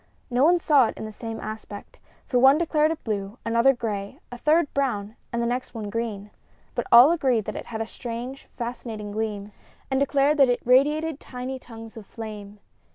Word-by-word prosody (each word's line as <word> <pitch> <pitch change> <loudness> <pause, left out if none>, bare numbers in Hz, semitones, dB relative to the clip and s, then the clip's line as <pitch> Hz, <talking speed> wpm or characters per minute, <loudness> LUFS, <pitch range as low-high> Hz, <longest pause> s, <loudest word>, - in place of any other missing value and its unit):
No 245 +2 +3
one 345 +4 +6
saw 290 -7 +4
it - - -6
in - - -5
the 215 - -6
same 225 +1 -6
aspect, 215 -1 -8 0.3
for 250 - +1
one 270 +3 +7
declared 310 -2 +2
it 325 - -4
blue, 205 0 -3
another 235 +3 +4
gray, 210 -5 -4
a 245 - -7
third 305 +2 +2
brown 220 -6 -1 0.2
and 235 -1 -1
the - - 0
next 245 +1 -3
one 210 -2 -5
green. 210 -3 -4 0.4
But - - -3
all 245 +6 +9
agreed 260 -10 +1
that - - -5
it - - -6
had 225 -1 -4
a - - -1
strange, 240 +3 -7
fascinating 230 -3 -5
gleam, 210 -1 -3 0.4
and 265 - +2
declared 280 +2 +2
that 275 -3 +6
it 245 - 0
radiated 295 +4 +3
tiny 255 +1 -6
tongues 225 -2 -11
of 210 -3 -10
flame. 210 -3 -8
235 Hz, 195 wpm, -25 LUFS, 220-270 Hz, 0.4 s, all